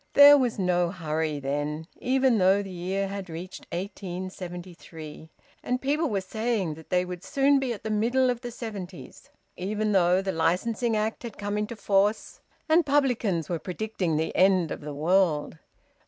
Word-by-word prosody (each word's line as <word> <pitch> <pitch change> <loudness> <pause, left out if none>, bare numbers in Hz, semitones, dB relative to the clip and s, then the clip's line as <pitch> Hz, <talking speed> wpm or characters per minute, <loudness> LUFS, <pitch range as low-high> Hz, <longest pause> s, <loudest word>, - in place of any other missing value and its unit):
There 285 0 +10
was 255 -5 +1
no 180 -2 +1
hurry 160 -4 -2
then, 145 +3 -3
even 260 -2 +2
though 190 +2 +4
the 195 - -8
year 185 +2 -2
had 195 -1 -6
reached 175 +4 -8
1873 175 -4 -7 0.3
and 250 0 -1
people 295 +4 0
were 200 -3 0
saying 215 -3 -1
that 160 +1 -13
they 180 0 +2
would 180 0 -7
soon 280 0 +3
be 265 -2 -1
at 220 - -6
the 220 - -3
middle 245 +4 +2
of 245 -1 -5
the 245 - -5
seventies; 205 -6 -8 0.3
even 210 +3 -1
though 180 -2 +4
the 190 0 -2
Licensing 210 +8 0
Act 215 +1 -1
had 235 -4 -8
come 205 0 -3
into 210 +3 -2
force 205 0 +1 0.3
and 325 +2 +5
publicans 245 - +1
were 170 -2 -2
predicting 180 -3 -2
the 160 - -2
end 185 -3 +4
of - - -5
the 150 0 -6
world. 160 -1 +1
195 Hz, 170 wpm, -27 LUFS, 175-225 Hz, 0.3 s, There